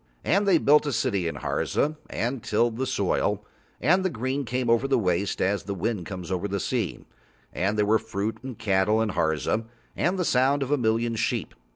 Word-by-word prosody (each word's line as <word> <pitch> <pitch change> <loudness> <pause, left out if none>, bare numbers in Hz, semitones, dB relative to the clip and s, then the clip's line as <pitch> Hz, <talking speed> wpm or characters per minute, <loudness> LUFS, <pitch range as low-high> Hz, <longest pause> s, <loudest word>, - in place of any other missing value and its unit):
And 200 +2 +2
they 185 -4 +6
built 150 0 +4
a - - 0
city 100 -9 0
in 80 - -3
Harza 155 +2 -1
and 120 +2 -2
tilled 115 +2 +1
the 130 +1 -1
soil, - - 0 0.3
and 185 +4 +3
the 185 - +1
green 130 +1 -2
came 125 +1 -2
over 115 +3 +3
the 135 - +3
waste 95 -2 0
as 100 +2 +1
the 100 0 -3
wind 100 -2 -2
comes 90 -2 -6
over 95 +2 -1
the 100 0 -2
sea, 115 -6 -2 0.5
and 100 +4 0
there 105 - +3
were 110 +2 +3
fruit 110 -1 -3
and 130 -4 -7
cattle 105 0 +2
in 110 -1 +1
Harza 80 +6 0 0.3
and 180 +3 0
the 180 - 0
sounds 135 +2 +3
of 135 - -5
a 145 - +4
million 115 0 +1
sheep. 115 - -1
115 Hz, 205 wpm, -26 LUFS, 100-130 Hz, 0.5 s, they